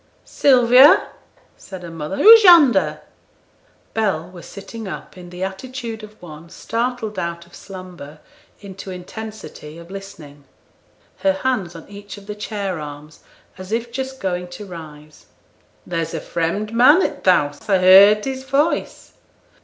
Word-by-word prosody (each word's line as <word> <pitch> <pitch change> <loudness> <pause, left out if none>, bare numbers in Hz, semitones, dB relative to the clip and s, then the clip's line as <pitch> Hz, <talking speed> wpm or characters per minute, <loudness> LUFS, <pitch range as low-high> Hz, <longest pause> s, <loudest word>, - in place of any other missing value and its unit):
'Sylvia!' 255 +1 +5 0.5
said 190 -2 -11
her 170 - -8
mother, 165 +2 -6
'who's 450 +1 +8
yonder?' 240 - +5 0.9
Bell 185 -6 -2
was 175 -2 -12
sitting 215 +2 -9
up - - -9
in 180 -1 -12
the 180 +1 -7
attitude 225 +3 -6
of 215 0 -14
one 165 -1 -12
startled 225 +1 -4
out 170 0 -5
of 170 - -24
slumber 180 -6 -11 0.4
into 195 -1 -10
intensity 185 -4 -9
of 170 +2 -13
listening; 165 -8 -11 0.7
her 195 -1 +2
hands 195 -5 -2
on 165 - -11
each 205 0 -11
of 200 - -14
the 210 - -6
chair 205 -4 -5
arms, 150 +1 -10 0.4
as 185 +1 -10
if 235 +1 -3
just 265 +1 -6
going 180 -2 -3
to 175 +4 -10
rise. 155 -4 -12 0.6
'There's 165 -2 -4
a - - -3
fremd 175 +6 -3
man 260 +10 +5
i' - - +1
t' - - -2
house. 145 -1 0
I 195 - +4
heerd 195 +3 +6
his 265 -1 -5
voice!' 275 +5 -2
195 Hz, 145 wpm, -20 LUFS, 170-225 Hz, 0.9 s, who's